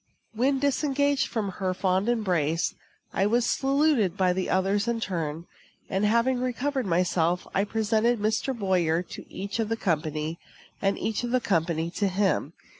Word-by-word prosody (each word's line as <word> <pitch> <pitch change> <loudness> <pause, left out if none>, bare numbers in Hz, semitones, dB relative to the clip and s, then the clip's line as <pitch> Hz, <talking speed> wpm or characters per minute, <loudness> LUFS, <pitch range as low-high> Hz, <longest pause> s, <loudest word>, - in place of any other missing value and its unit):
When 260 +5 +2
disengaged 285 0 +1
from 215 -4 -2
her 185 -1 0
fond 190 +3 +1
embrace, 175 -9 +1 0.4
I 195 - +2
was 235 +2 +2
saluted 270 - +2
by 185 -2 +3
the 185 0 -2
others 195 +3 +1
in 235 -1 0
turn; 165 -5 -3 0.5
and, 195 +2 +1
having 235 +4 +2
recovered 255 0 -1
myself, 175 0 +1
I 195 - +2
presented 225 +2 +1
Mr. 220 +5 -1
Boyer 180 -5 +1
to - - -11
each 200 +3 -4
of 220 -1 0
the 225 - 0
company, 155 -3 -1 0.4
and 195 0 +1
each 225 +2 -2
of 240 - -2
the 255 +1 +2
company 165 -5 0
to 200 +3 0
him. 190 -5 0
200 Hz, 160 wpm, -27 LUFS, 180-240 Hz, 0.5 s, by